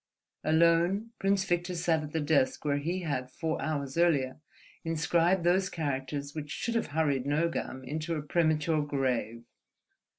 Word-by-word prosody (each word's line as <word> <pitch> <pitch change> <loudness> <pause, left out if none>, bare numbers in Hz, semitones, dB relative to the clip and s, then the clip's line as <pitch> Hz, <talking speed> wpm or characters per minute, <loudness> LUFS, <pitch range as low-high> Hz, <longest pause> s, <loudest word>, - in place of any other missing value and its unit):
Alone, 170 +7 +3
Prince 195 0 +2
Victor 175 0 -1
sat 165 -2 +1
at 150 -1 -7
the 160 - -1
desk 145 -2 +1
where 145 -1 +1
he 175 +6 -2
had, 130 -5 -2
four 160 +4 -3
hours 145 -1 -2
earlier, 145 -6 +2 0.4
inscribed 170 +2 +2
those 185 +2 +3
characters 140 -2 -3
which 150 -2 -6
should 225 +11 -3
have 230 - 0
hurried 145 -3 0
Nogam 145 -3 -1
into 155 +5 -3
a 150 - -3
premature 155 0 +1
grave. 130 -5 -1
155 Hz, 145 wpm, -30 LUFS, 140-170 Hz, 0.4 s, Alone